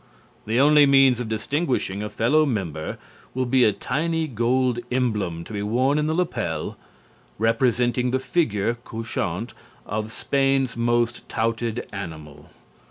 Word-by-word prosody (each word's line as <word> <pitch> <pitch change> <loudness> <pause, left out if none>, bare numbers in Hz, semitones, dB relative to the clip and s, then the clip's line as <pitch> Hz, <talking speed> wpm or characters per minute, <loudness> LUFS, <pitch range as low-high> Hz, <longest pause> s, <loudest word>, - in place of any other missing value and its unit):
The 115 +3 +1
only 145 +1 +6
means 135 -3 +5
of 120 -3 -4
distinguishing 110 - -1
a 105 - -3
fellow 120 +9 +3
member 95 - -3 0.4
will 130 0 0
be 125 +1 +3
a 110 - +5
tiny 160 +10 -1
gold 125 0 +1
emblem, 105 -10 -1
to 110 - -10
be 100 - -2
worn 130 +8 +1
in 150 - 0
the 160 - 0
lapel, 120 - -2 0.6
representing 120 +2 +1
the 130 - +1
figure 120 - 0
(couchant) 115 0 -4 0.3
of 110 +1 -3
Spain's 135 -1 +1
most 120 0 0
touted 115 +1 -1
animal. 75 -6 -8
120 Hz, 135 wpm, -24 LUFS, 105-135 Hz, 0.6 s, only